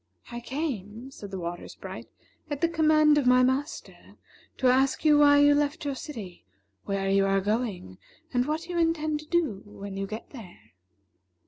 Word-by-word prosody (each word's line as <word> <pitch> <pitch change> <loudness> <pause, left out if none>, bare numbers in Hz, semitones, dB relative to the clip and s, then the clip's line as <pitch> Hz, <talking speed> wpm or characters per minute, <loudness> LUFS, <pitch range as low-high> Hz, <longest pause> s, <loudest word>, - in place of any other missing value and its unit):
"I 240 - -5
came," 240 - -5
said 205 -6 -10
the 195 - -5
Water 175 0 -5
Sprite, - - -9 0.4
"at 290 -1 -4
the 335 - +4
command 310 -2 +4
of 265 - -1
my 250 0 +6
master, 265 +4 -3 0.4
to - - -3
ask 265 +4 +3
you 300 -1 +6
why 285 -1 +6
you 290 0 +6
left 290 +2 0
your 285 - -1
city, 225 - -8 0.4
where 195 -1 -2
you 195 0 +3
are 195 0 +2
going, 205 - -3 0.3
and 245 +1 +1
what 310 +2 -2
you 350 -1 -2
intend 310 -2 0
to 305 - -12
do 315 - 0
when 200 -1 -9
you 195 0 -3
get 220 +3 -8
there." 175 - -13
260 Hz, 180 wpm, -27 LUFS, 200-300 Hz, 0.4 s, my